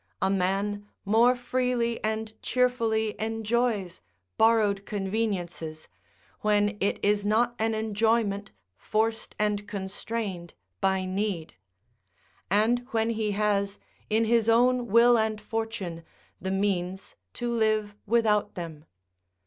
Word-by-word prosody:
A 190 - +1
man 200 +2 0 0.2
more 230 +5 +5
freely 245 -2 -1
and 220 0 -2
cheerfully 230 -4 +1
enjoys 225 -3 -1 0.3
borrowed 215 -3 +3
conveniences, 190 -6 -3 0.5
when 210 0 +2
it 200 - +1
is 205 0 +2
not 225 +4 +2
an 220 0 +1
enjoyment 220 -1 +1 0.3
forced 220 - -1
and 210 -1 0
constrained 195 -2 -5 0.2
by 190 -1 +1
need; 185 -3 -2 1.0
and 215 +5 +3
when 225 0 +1
he 215 -2 -1
has, 200 -1 0 0.3
in 220 +1 +2
his 230 0 +3
own 245 +1 +4
will 235 +2 +6
and 220 -1 0
fortune, 210 -7 -4 0.4
the 190 - -3
means 190 -1 -1 0.2
to 240 0 -2
live 215 -2 +1
without 210 -2 +2
them. 160 -4 -7
215 Hz, 110 wpm, -27 LUFS, 200-225 Hz, 1.0 s, will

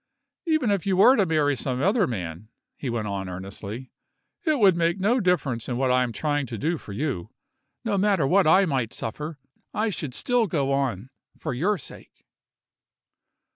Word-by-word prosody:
"Even 310 -9 +2
if 200 -2 -1
you 190 -2 +2
were 250 +7 +7
to 200 -6 +2
marry 150 -3 +2
some 130 0 -3
other 200 - +3
man," 90 -3 -5 0.3
he 135 - -5
went 115 -2 -2
on 95 -2 -3
earnestly, 100 +6 -7 0.5
"it 310 -5 +2
would 195 -7 +5
make 170 +2 +1
no 225 +7 +2
difference 155 - 0
in 120 - -1
what 130 0 +2
I 125 0 +4
am 125 -2 0
trying 145 +1 -1
to 115 - -5
do 160 +6 -1
for - - -11
you. 120 - -3 0.6
No 205 -3 +1
matter 195 -6 +3
what 185 +5 +4
I 185 +5 +6
might 130 -8 -1
suffer, 150 +7 -5 0.4
I 220 +1 +1
should 150 -9 -4
still 245 -3 +1
go 140 -5 0
on 130 -4 -1 0.3
for - - -4
your 190 +12 +1
sake." - - -13
145 Hz, 180 wpm, -25 LUFS, 120-195 Hz, 0.6 s, were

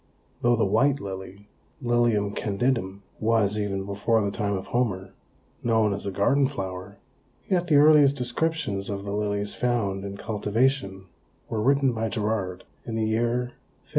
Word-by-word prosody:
Though 120 0 +4
the 115 - +2
white 135 +8 +2
lily 95 0 -8 0.3
(Lilium 120 -5 +1
candidum) 100 -2 -1 0.2
was, 110 -2 +2
even 100 -2 -2
before 100 +3 +1
the 100 - -1
time 100 -2 -1
of 95 - -6
Homer, 95 -6 -1 0.5
known 110 -3 +2
as 100 - -5
a - - -1
garden 135 +8 +2
flower, 95 -6 -6 0.5
yet 180 -2 +1
the 155 - +3
earliest 145 -1 +6
descriptions 125 -5 -2
of 100 0 -4
the 100 - -4
lilies 105 0 -1
found 105 -6 -1
in 100 0 -6
cultivation 105 -1 -1 0.4
were 110 -2 -1
written 135 +1 +3
by 115 0 -2
Gerard 105 -4 -2 0.2
in 115 - -5
the 110 -1 0
year 120 +3 0
1597. - - -31
110 Hz, 155 wpm, -26 LUFS, 100-120 Hz, 0.5 s, earliest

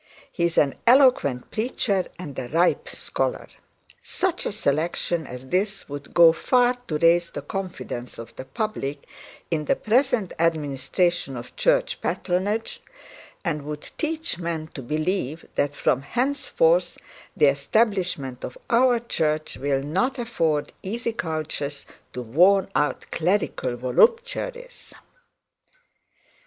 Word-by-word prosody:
He 170 - 0
is 170 - -1
an 140 -2 +4
eloquent 245 - +4
preacher 215 -4 0
and 145 -7 -6
a 125 - -4
ripe 175 - +2
scholar. - - -2 0.5
Such 375 -2 -1
a - - -2
selection 170 -3 -1
as 125 +1 -9
this 195 +3 0
would 145 0 -8
go 170 -1 +8
far 245 +7 +3
to 155 - -1
raise 170 +2 +4
the 145 - -7
confidence 155 -8 -5
of 115 0 -10
the 130 - -7
public 145 - -4 0.5
in 155 -2 0
the - - +2
present 235 -3 +1
administration 160 -1 0
of 120 +1 -9
church - - +1
patronage, 200 +5 -1 0.6
and 150 -3 -1
would 150 +1 -7
teach 315 - -2
men 165 -2 -3
to 135 - -6
believe 155 +3 -2
that 145 0 0
from 130 - +1
henceforth 285 - +1 0.4
the - - +5
establishment 145 - +1
of 125 - -6
our 245 +1 +5
church 155 -9 -1
will 135 0 0
not 220 - 0
afford 165 -11 -1
easy 230 +4 -3
couches 155 -6 -4 0.3
to 125 - -4
worn 185 - +4
out 150 - 0
clerical 165 -8 0
voluptuaries.' 485 - 0
170 Hz, 125 wpm, -24 LUFS, 145-230 Hz, 0.6 s, go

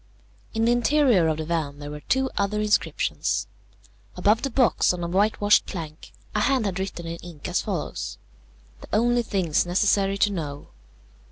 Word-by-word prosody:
In 225 0 +2
the 235 - +4
interior 240 - +3
of 155 -1 0
the 155 - -4
van 155 -4 -2
there 145 0 -7
were 150 - -7
two 265 - 0
other 205 +1 0
inscriptions. 210 - 0 0.7
Above 215 +3 +3
the 275 - -1
box, 245 -6 +3
on 175 -1 -5
a - - -1
whitewashed 205 +3 +3
plank, 160 -4 -7 0.2
a 210 - +1
hand 255 +1 +2
had 190 -2 -2
written 190 -3 -4
in 165 0 -5
ink 170 -1 -9
as 180 0 0
follows: 190 -8 -4 0.6
"THE - - -12
ONLY 240 +3 +3
THINGS 180 -7 0
NECESSARY 195 +1 +2
TO 205 - +2
KNOW. 145 -6 -5
195 Hz, 170 wpm, -25 LUFS, 170-220 Hz, 0.7 s, the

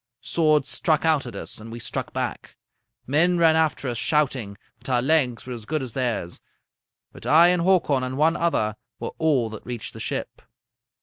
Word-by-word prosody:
Swords 155 -4 +2
struck 155 0 0
out 155 -5 +2
at 120 - -8
us, - - -5
and 115 +1 -10
we 115 - -6
struck 120 - -4
back. - - -5 0.5
Men 170 +6 +3
ran 165 -2 +5
after 160 -3 +1
us 120 -2 -2
shouting, 130 -8 0 0.2
but - - -9
our 125 -1 +3
legs 130 -3 +1
were 125 - -5
as 115 -3 -8
good 155 +1 -2
as 125 -4 -7
theirs. 115 -9 -2 0.7
But - - -10
I 165 +3 +7
and 180 -1 +2
Hakon 170 -7 +3
and 130 +1 -3
one 160 +3 +3
other 110 -11 0 0.2
were - - -4
all 135 -8 +2
that 110 - -8
reached 120 -3 -6
the - - -10
ship. - - -4
140 Hz, 190 wpm, -24 LUFS, 120-160 Hz, 0.7 s, I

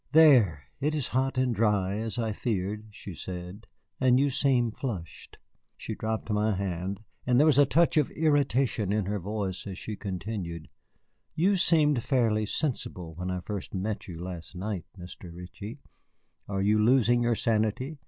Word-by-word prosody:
"There, 125 - +6 0.2
it 150 +3 0
is 145 -5 -2
hot 130 0 0
and 130 -1 +2
dry, 105 -3 +1
as 115 +1 -3
I 115 -3 -1
feared," 105 0 -2
she 105 -2 -9
said, 90 +5 -7 0.3
"and 130 -1 +4
you 140 0 +2
seem 125 -4 +2
flushed." 100 - -6 0.4
She - - -5
dropped 110 0 -3
my 105 0 +2
hand, 95 +2 -3 0.2
and 125 0 +4
there 150 - +6
was 150 -3 +5
a 145 - +6
touch 170 -1 +3
of 150 - +3
irritation 135 - +1
in 105 -1 +1
her 105 +1 -2
voice 100 0 -4
as 95 -2 -6
she 105 - -5
continued: 95 -4 -5 0.7
"You 190 +5 +3
seemed 150 -7 +3
fairly 110 -5 +1
sensible 95 - -3
when 90 +3 -5
I 90 -1 -2
first 100 0 -6
met 105 +3 -3
you 85 -3 -7
last 90 0 -7
night, 95 -2 -4
Mr. 90 0 -10
Ritchie. 90 +6 -8 0.7
Are 95 -1 -1
you 105 +2 +3
losing 120 +1 +4
your 120 -1 +2
sanity? 115 +7 0
110 Hz, 165 wpm, -28 LUFS, 95-130 Hz, 0.7 s, There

